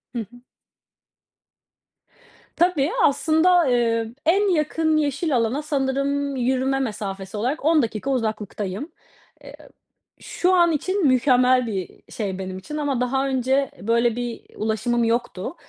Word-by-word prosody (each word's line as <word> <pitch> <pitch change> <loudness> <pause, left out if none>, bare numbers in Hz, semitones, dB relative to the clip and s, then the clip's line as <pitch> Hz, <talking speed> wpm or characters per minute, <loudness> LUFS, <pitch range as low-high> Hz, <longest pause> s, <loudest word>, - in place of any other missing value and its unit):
Hı - - -1
hı. 240 +3 -9 2.1
Tabii 335 -3 +2
aslında, 320 +4 +3
eee, 230 -2 +1
en 390 +5 +3
yakın 315 +1 +1
yeşil 290 0 0
alana 240 +4 0
sanırım 280 -1 -1
yürüme 260 +2 0
mesafesi 200 -5 -4
olarak 260 +8 -2
10 320 -1 +4
dakika 230 +2 -3
uzaklıktayım. 215 - -3 0.5
Eee, - - -11
ı - - -16 0.5
şu 365 +1 0
an 345 -2 +4
için 370 +3 0
mükemmel 255 -1 +3
bir 220 - -3 0.2
i - - -21
şey 195 -4 -4
benim 185 -1 -5
için 300 +11 -7
ama 285 -4 -1
daha 265 +2 0
önce 265 +1 0
e - - -10
böyle 235 0 +2
bir 245 - -3 0.3
i - - -19
ulaşımım 225 +2 0
yoktu. 230 - -2
260 Hz, 140 wpm, -23 LUFS, 230-300 Hz, 2.1 s, 10